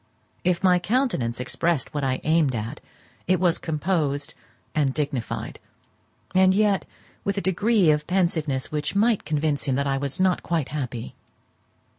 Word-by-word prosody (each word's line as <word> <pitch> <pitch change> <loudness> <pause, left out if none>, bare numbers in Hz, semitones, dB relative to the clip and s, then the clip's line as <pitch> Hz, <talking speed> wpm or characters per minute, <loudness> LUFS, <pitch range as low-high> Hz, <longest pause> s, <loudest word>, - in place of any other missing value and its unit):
If 180 0 +1
my 180 -1 +5
countenance 185 - 0
expressed 130 +4 -1
what 145 -1 -2
I 130 -1 0
aimed 155 -4 +2
at, 115 +6 -4 0.5
it 185 -1 +3
was 175 -2 +2
composed 155 -3 -1 0.4
and 140 -4 +1
dignified; 140 -6 -3 0.7
and 185 0 +5
yet, 205 -2 +2 0.4
with 200 0 -1
a - - +3
degree 195 -1 +3
of 150 0 0
pensiveness 165 -7 0
which 150 +3 -2
might 215 +1 +2
convince 150 -1 0
him 135 - +1
that 140 +1 0
I 135 -1 0
was 140 +2 -2
not 185 -1 +2
quite 165 -5 -1
happy. 125 -6 -4
155 Hz, 150 wpm, -24 LUFS, 140-185 Hz, 0.7 s, my